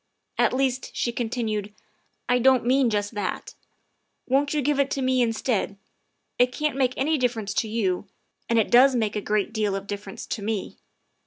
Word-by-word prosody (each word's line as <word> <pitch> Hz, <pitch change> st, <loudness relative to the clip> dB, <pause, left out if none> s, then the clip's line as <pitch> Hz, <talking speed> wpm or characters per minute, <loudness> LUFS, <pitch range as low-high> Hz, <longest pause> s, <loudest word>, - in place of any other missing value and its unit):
"At -, -, +4 dB
least," 260 Hz, -1 st, 0 dB
she 240 Hz, -, 0 dB
continued, 220 Hz, -3 st, -3 dB, 0.3 s
" -, -, -46 dB
I 245 Hz, +1 st, +3 dB
don't 260 Hz, -1 st, +4 dB
mean 260 Hz, 0 st, +3 dB
just 205 Hz, 0 st, -1 dB
that. 205 Hz, -, -4 dB, 0.7 s
Won't 275 Hz, +2 st, +1 dB
you 300 Hz, -2 st, 0 dB
give 290 Hz, +1 st, +1 dB
it 280 Hz, 0 st, +2 dB
to 275 Hz, -, -2 dB
me 255 Hz, 0 st, +2 dB
instead? 225 Hz, -3 st, 0 dB, 0.6 s
It 250 Hz, 0 st, +4 dB
can't 300 Hz, +2 st, -1 dB
make 260 Hz, -2 st, +1 dB
any 300 Hz, +3 st, +1 dB
difference 225 Hz, -5 st, -1 dB
to 220 Hz, -, 0 dB
you, 205 Hz, -4 st, -1 dB, 0.4 s
and 230 Hz, -, +2 dB
it 220 Hz, -, +2 dB
does 255 Hz, +2 st, +6 dB
make 220 Hz, -3 st, 0 dB
a 210 Hz, -, -1 dB
great 210 Hz, 0 st, -1 dB
deal 210 Hz, -3 st, 0 dB
of 195 Hz, 0 st, -5 dB
dif 205 Hz, 0 st, -5 dB
ference 195 Hz, -, -8 dB
to -, -, -3 dB
me. 205 Hz, -1 st, -3 dB
235 Hz, 190 wpm, -25 LUFS, 210-260 Hz, 0.7 s, does